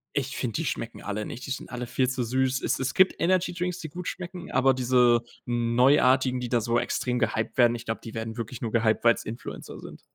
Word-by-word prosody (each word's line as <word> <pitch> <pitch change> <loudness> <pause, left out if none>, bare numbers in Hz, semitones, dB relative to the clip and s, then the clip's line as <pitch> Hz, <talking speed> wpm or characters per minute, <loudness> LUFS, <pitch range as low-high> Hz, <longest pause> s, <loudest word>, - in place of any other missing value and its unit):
ich 135 -1 -2
finde, 120 -4 -2
die 165 - -2
schmecken 115 -2 -4
alle 105 +1 -3
nicht. 125 - -7
Die - - -5
sind 135 - -5
alle 125 -1 -4
viel 130 +1 +1
zu 130 0 -2
süß. 130 +2 0
Es - - 0
es 130 0 -2
gibt 190 0 +4
Energydrinks, 180 0 0
die 155 - -6
gut 175 +2 -7
schmecken, 180 0 -6
aber 130 +1 +4
diese 125 -2 +4 0.2
Neuartigen, 125 +2 +3
die 125 -1 -4
da 120 -2 +2
so 120 +1 +1
extrem 125 +1 -1
gehyped 110 -1 -1
werden, 120 -1 +5
ich 120 0 -8
glaube, 110 - -3
die 115 - -8
werden 110 +1 -5
wirklich 115 +1 -6
nur 115 -2 -3
gehyped, 110 -1 +2
weil's 115 0 +3
Influencer 115 +2 -7
sind. - - -11
125 Hz, 225 wpm, -26 LUFS, 115-135 Hz, 0.2 s, werden